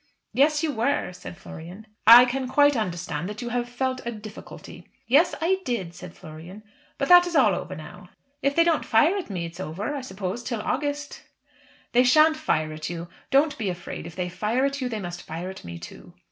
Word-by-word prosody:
"Yes; 295 +3 +3
you 315 - +1
were," 240 -4 -1
said 180 -1 -10
Florian. 175 +7 -10 0.2
"I 240 +2 +11
can 255 +1 -2
quite 290 +2 +4
understand 175 -5 -3
that 210 +4 -6
you 240 - -4
have 240 0 -2
felt 255 +1 -2
a 235 - -3
difficulty." 215 -1 -11 0.2
"Yes, 285 +8 +4
I 380 +4 +1
did," 225 - -3
said 180 0 -11
Florian. 165 +6 -11 0.3
"But 275 - -1
that 355 0 +8
is 345 - -4
all - - +5
over - - -5
now." - - -11 0.3
"If 280 0 +1
they 335 - +6
don't 335 -2 +2
fire 295 - +3
at 390 - -4
me 180 -4 -3
it 165 - -7
is 170 - -15
over, 190 - -4
I 280 - -4
suppose, 190 -1 -5
till 235 -4 -3
August." 290 +1 -3 0.7
"They 245 +1 +5
shan't 310 +5 +5
fire 155 - -1
at 155 0 -5
you. 170 0 -6 0.2
Don't 290 +1 +2
be 210 -4 -1
afraid. 175 -2 -6
If 170 - -11
they 180 -1 -2
fire 215 +8 0
at 275 0 -2
you, 250 - -1
they 220 -3 -3
must 175 -2 -6
fire 170 +4 -6
at 190 - -11
me 85 0 -7
too." 85 - -12
230 Hz, 215 wpm, -25 LUFS, 180-280 Hz, 0.7 s, I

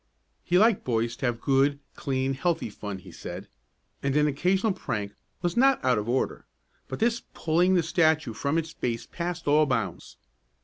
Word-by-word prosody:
He 175 - +2
liked 220 +1 +4
boys 115 -1 0
to 135 - -1
have 120 -1 -1
good, 140 +2 +2 0.2
clean 135 0 -1
healthy 165 -3 -1
fun, 105 -1 -6
he 95 - -13
said, - - -8 0.5
and 140 0 0
an 150 0 +4
occasional 185 +8 +1
prank 105 - -4 0.3
was 175 -1 0
not 270 - +4
out 125 -4 +3
of 105 +2 -4
order, 130 +2 -1 0.4
but 130 - -5
this 230 +1 +1
pulling 175 +4 +2
the 175 - +3
statue 160 -6 +2
from 140 +7 -1
its 165 0 -2
base 115 -1 -3
passed 170 +2 -5
all 150 +1 +5
bounds. 115 - -3
145 Hz, 175 wpm, -27 LUFS, 120-175 Hz, 0.5 s, all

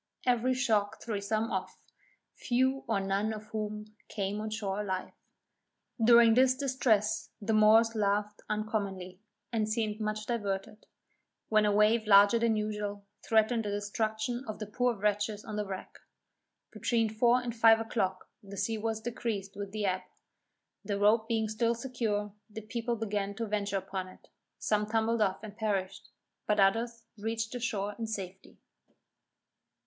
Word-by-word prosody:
Every 250 +1 +2
shock 215 -5 +1
threw 210 -4 -3
some 215 +3 -1
off; - - -3 0.6
few 260 +2 0
or 225 -3 +1
none 195 +2 0
of 215 0 -8
whom 210 -1 -4 0.2
came 205 0 -2
on 215 - -3
shore 210 -2 -2
alive. 190 -2 -3 0.9
During 235 0 +7
this 255 +2 +5
distress 255 -6 +1
the 220 +1 -1
Moors 220 +1 +6
laughed 210 -1 0
uncommonly, 200 -4 -3 0.3
and 215 -2 0
seemed 215 -1 -1
much 215 0 -2
diverted, 210 -2 -3 0.6
when 215 -1 +4
a - - +3
wave 215 +2 +3
larger 205 +2 +7
than 230 -1 +2
usual, 210 -1 -3 0.2
threatened 225 +1 +2
the 205 - -3
destruction 220 +4 -2
of 215 - -5
the 215 - -5
poor 245 +3 0
wretches 210 +1 -1
on 215 - -5
the 210 -1 -2
wreck. 190 -1 -7 0.7
Between 230 -2 +1
four 235 +3 +3
and 240 -2 -5
five 225 -1 +6
o'clock 190 -4 -2
the 200 0 -10
sea 225 +3 -1
was 220 0 -2
decreased 220 -4 -4
with 200 -1 -6
the 210 0 -2
ebb; 185 -1 0 0.8
the 200 0 -2
rope 215 +2 +3
being 225 -2 0
still 230 +2 0
secure, 225 -5 -2 0.2
the 220 +1 -7
people 235 +2 -3
began 205 -2 -2
to 230 +2 -3
venture 205 -2 -1
upon 190 -1 -4
it; 185 - -17 0.3
some 210 -1 0
tumbled 225 +1 +1
off 195 0 +1
and 210 -1 -8
perished, 200 -4 -2 0.4
but 210 0 +2
others 230 +4 +2 0.2
reached 225 +1 -2
the 245 - -4
shore 205 -3 -2
in 225 - -2
safety. 190 -3 -7
215 Hz, 155 wpm, -30 LUFS, 205-225 Hz, 0.9 s, During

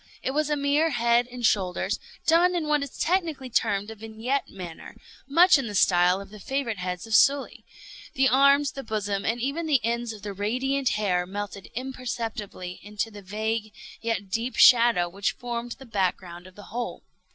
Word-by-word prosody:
It - - -1
was 300 +2 0
a 295 - +2
mere 290 +3 +2
head 235 -2 +2
and 245 -1 -4
shoulders, 185 -4 +1 0.3
done 350 +2 +4
in 325 -3 -1
what 300 -1 +2
is 280 -2 -6
technically 320 -7 -1
termed 205 -2 0
a - - -6
vignette 225 +5 -3
manner; 175 -4 -9 0.3
much 340 +3 +6
in 265 - -3
the 205 - -5
style 180 0 +4
of 200 0 -10
the 210 - -11
favorite 240 -3 -3
heads 180 +1 -4
of 225 - -6
Sully. 275 +4 +3 0.5
The 265 0 +4
arms, 280 +2 +4
the 275 - -7
bosom, 205 -4 -3
and 230 +2 0
even 280 +7 -2
the 290 -4 +4
ends 235 0 -1
of 215 -2 -11
the 205 -1 -5
radiant 255 +7 0
hair 180 -4 0
melted 200 0 -6
imperceptibly 230 -7 -5
into 210 +2 -4
the 205 -1 -10
vague 215 +2 -3 0.3
yet 205 -4 -3
deep 230 +4 -2
shadow 235 -8 +6
which 195 +3 -2
formed 240 0 -5
the 265 - -13
back 195 -6 0
ground 175 -1 -11
of 185 - -16
the 205 - -12
whole. 240 0 -4
230 Hz, 185 wpm, -26 LUFS, 200-270 Hz, 0.5 s, much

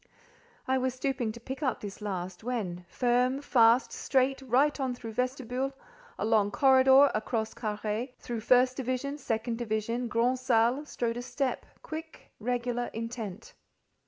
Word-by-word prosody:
I 260 0 +2
was 255 0 -1
stooping 255 -4 -1
to 235 - -10
pick 265 +4 -7
up 265 -4 0
this 205 0 -8
last, 185 -2 -4
when—firm, 245 +5 0
fast, 235 -1 +4
straight—right 270 +2 +1
on 260 -2 -1
through 230 -2 -7
vestibule—along 250 - -2
corridor, 265 +3 +6
across 220 0 -2
carré, 215 +3 -3
through 240 -2 -5
first 250 +3 +4
division, 265 +3 -2
second 230 -2 -2
division, 230 +1 -1
grand 240 +2 +1
salle—strode 240 0 +1
a - - -3
step, 260 +1 -2 0.2
quick, 320 +1 -8
regular, 245 +1 -1
intent. 225 -2 -6
245 Hz, 125 wpm, -29 LUFS, 225-265 Hz, 0.2 s, corridor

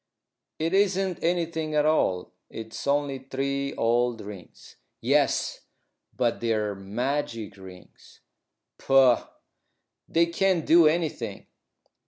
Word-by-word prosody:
"It 165 +3 -1
isn't 195 -2 +1
anything 165 -2 -1
at 150 0 +3
all. 95 -13 +1 0.2
It's 110 +3 -7
only 140 -1 0
three 140 +1 -3
old 120 0 +1
rings." 100 -3 -12 0.2
"Yes, - - +1 0.6
but 120 -2 0
they're 110 -3 0
magic 115 +2 -3
rings." 95 -2 -15 0.6
"Pooh! 135 -3 +5 0.9
They 170 +1 +3
can't 170 0 +1
do 165 -1 +6
anything." 160 0 -2
140 Hz, 100 wpm, -26 LUFS, 115-165 Hz, 0.9 s, do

